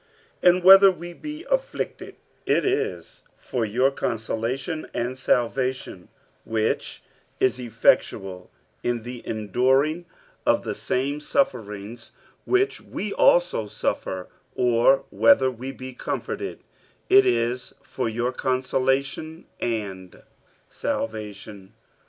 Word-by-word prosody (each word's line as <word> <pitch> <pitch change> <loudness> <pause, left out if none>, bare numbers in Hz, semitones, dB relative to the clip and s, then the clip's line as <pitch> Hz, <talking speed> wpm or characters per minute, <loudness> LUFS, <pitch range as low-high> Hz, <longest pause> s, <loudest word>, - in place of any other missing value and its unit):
47:001:006 - - +7
And 180 - -4
whether 195 +1 +10
we 175 -1 -8
be 305 - -8
afflicted, - - -2 0.3
it - - +2
is 430 +3 -2 0.2
for 125 -3 -3
your 125 +6 +2
consolation 125 +7 -3
and 120 +2 -2
salvation, 125 -5 -1 0.3
which 110 -1 -2 0.4
is 130 0 +2
effectual 95 -5 +1 0.3
in 120 -2 -1
the 120 0 -7
enduring 130 - +1 0.4
of - - +2
the - - -3
same 140 +3 -2
sufferings 115 - -2 0.3
which 390 +2 +1
we 205 0 -5
also 175 -11 +3
suffer: 95 -2 -3 0.3
or 125 +2 +3
whether 115 +5 +5
we 130 +2 -7
be 130 -1 -9
comforted, - - -5 0.4
it 390 +1 +6
is 125 - 0
for 125 -3 -3
your 120 +3 -1
consolation 135 +5 -1
and 95 -6 -4 0.4
salvation. 105 -2 -5
125 Hz, 105 wpm, -24 LUFS, 110-155 Hz, 0.4 s, whether